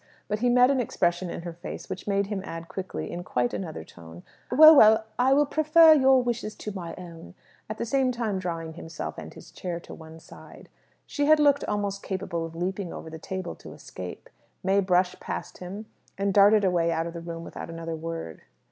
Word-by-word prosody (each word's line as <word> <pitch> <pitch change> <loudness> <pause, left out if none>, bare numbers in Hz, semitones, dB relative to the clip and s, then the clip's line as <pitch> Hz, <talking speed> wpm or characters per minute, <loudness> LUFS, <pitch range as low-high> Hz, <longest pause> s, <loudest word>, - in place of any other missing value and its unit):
But 210 0 -2
he 245 +2 +2
met 250 +2 +5
an 270 - +1
expression 175 -6 0
in 170 - -6
her 170 -1 -6
face 175 +2 -8
which 185 +2 -7
made 200 0 +1
him 200 -1 -4
add 165 -2 -7
quickly, 185 +1 -6
in 175 +1 -5
quite 125 -8 -1
another 165 -5 -5
tone, 85 0 -13 0.3
"Well, 310 +5 +9
well, 220 -3 +6
I 255 +2 +4
will 295 +1 +4
prefer 315 +2 +6
your 265 -3 +5
wishes 235 -3 -3
to 210 - -6
my 175 -4 -7
own," 170 0 -11 0.3
at 215 - -5
the - - -3
same 260 +2 +1
time 225 -5 -2
drawing 165 -3 -4
himself 165 0 -7
and - - -9
his - - -14
chair 175 -2 -5
to - - -11
one 160 0 -12
side. - - -15 0.4
She 290 - -1
had 310 0 +6
looked 285 -1 +4
almost 205 -1 -2
capable 185 -4 -4
of 165 - -13
leaping 185 +1 -3
over 160 - -8
the 160 - -8
table 185 +1 -5
to - - -11
escape. 90 -1 -9 0.4
May 195 +1 +3
brushed 180 -1 +1
past - - -6
him, 195 +4 -7 0.3
and 200 0 0
darted 205 +1 +6
away 175 -3 +2
out 165 0 -1
of 170 - -6
the 170 - -7
room 165 0 -7
without - - -8
another 165 0 -5
word. 165 - -6
190 Hz, 210 wpm, -26 LUFS, 165-220 Hz, 0.4 s, Well